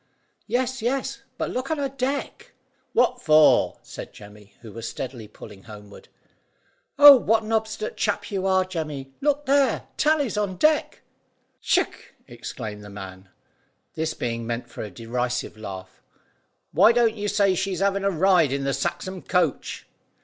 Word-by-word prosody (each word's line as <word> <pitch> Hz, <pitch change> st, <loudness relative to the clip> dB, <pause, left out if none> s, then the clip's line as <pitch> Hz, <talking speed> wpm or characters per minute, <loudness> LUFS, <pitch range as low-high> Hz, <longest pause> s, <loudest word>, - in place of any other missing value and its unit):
"Yes, 260 Hz, 0 st, -1 dB
yes; 255 Hz, +4 st, -2 dB, 0.2 s
but -, -, -2 dB
look 255 Hz, +2 st, -3 dB
on 315 Hz, -, 0 dB
her 280 Hz, -1 st, -1 dB
deck." 270 Hz, +1 st, -4 dB, 0.4 s
"What 245 Hz, +1 st, +2 dB
for?" 155 Hz, -4 st, +5 dB
said -, -, -9 dB
Jemmy, 105 Hz, -1 st, -15 dB
who 115 Hz, -2 st, -11 dB
was 115 Hz, 0 st, -6 dB
steadily 125 Hz, -4 st, -7 dB
pulling 105 Hz, -2 st, -13 dB
homeward. 105 Hz, -2 st, -12 dB, 0.9 s
"Oh, 290 Hz, -1 st, +11 dB
what 225 Hz, -3 st, +2 dB
an 215 Hz, -, -6 dB
obstinate 220 Hz, -1 st, -2 dB
chap 205 Hz, 0 st, -1 dB
you 195 Hz, -1 st, -1 dB
are, 190 Hz, -1 st, +3 dB
Jemmy! 155 Hz, -7 st, -5 dB
Look 290 Hz, 0 st, +1 dB
there; 275 Hz, 0 st, +2 dB
Tally's 295 Hz, -7 st, +1 dB
on 200 Hz, -3 st, -1 dB
deck." 305 Hz, -, +1 dB, 0.6 s
"Ck!" -, -, -1 dB
ejaculated 115 Hz, -3 st, -7 dB
the 105 Hz, -, -11 dB
man, 95 Hz, -2 st, -10 dB, 0.6 s
this 160 Hz, 0 st, -2 dB
being 115 Hz, -1 st, -3 dB
meant 120 Hz, 0 st, -4 dB
for -, -, -7 dB
a 105 Hz, -, -5 dB
derisive 120 Hz, +4 st, -3 dB
laugh. 95 Hz, -3 st, -9 dB, 0.7 s
"Why 200 Hz, +8 st, +6 dB
don't 235 Hz, -2 st, +3 dB
you 205 Hz, -1 st, -3 dB
say 200 Hz, -2 st, +2 dB
she's 190 Hz, 0 st, -2 dB
having 200 Hz, 0 st, +1 dB
a 195 Hz, -, +2 dB
ride 180 Hz, -4 st, +3 dB
in 140 Hz, 0 st, -2 dB
the 140 Hz, 0 st, 0 dB
Saxham 185 Hz, +7 st, -3 dB
coach." 175 Hz, -6 st, -1 dB
185 Hz, 155 wpm, -24 LUFS, -, 0.9 s, Oh